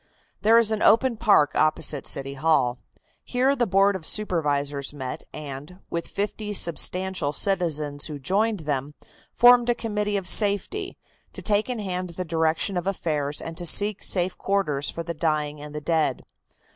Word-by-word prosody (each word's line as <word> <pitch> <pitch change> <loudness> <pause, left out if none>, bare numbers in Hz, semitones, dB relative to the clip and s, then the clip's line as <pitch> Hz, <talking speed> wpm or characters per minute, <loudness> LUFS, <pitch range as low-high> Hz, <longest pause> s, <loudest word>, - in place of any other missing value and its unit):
There 225 +2 +5
is 230 -2 +3
an 220 - -1
open 235 +3 +4
park 200 -9 +3
opposite 155 -2 +1
City 135 0 -2
Hall. 135 -4 +1 0.4
Here 260 +3 +1
the 240 -3 0
Board 195 +1 +3
of 185 - -6
Supervisors 145 -7 -1
met, 130 -3 -6
and, 150 +3 -8
with 170 0 -3
fifty 210 +1 -4
substantial 180 -2 +1
citizens 155 -7 -1
who 150 -2 -6
joined 200 +7 0
them, 145 -1 -3 0.4
formed 245 0 +5
a 240 - +3
Committee 210 -3 -2
of 190 -2 -3
Safety, 220 - +2 0.4
to - - -6
take 210 +2 +1
in 250 - -2
hand 185 -3 -4
the 185 - -3
direction 160 +3 0
of 175 +1 -3
affairs 150 -6 -2
and 165 - -7
to 175 - -3
seek 205 +4 +3
safe 180 -1 0
quarters 150 -8 -1
for 170 - -5
the 170 0 -5
dying 150 -2 -2
and 150 0 -9
the - - -3
dead. 155 -4 0
175 Hz, 165 wpm, -24 LUFS, 150-205 Hz, 0.4 s, There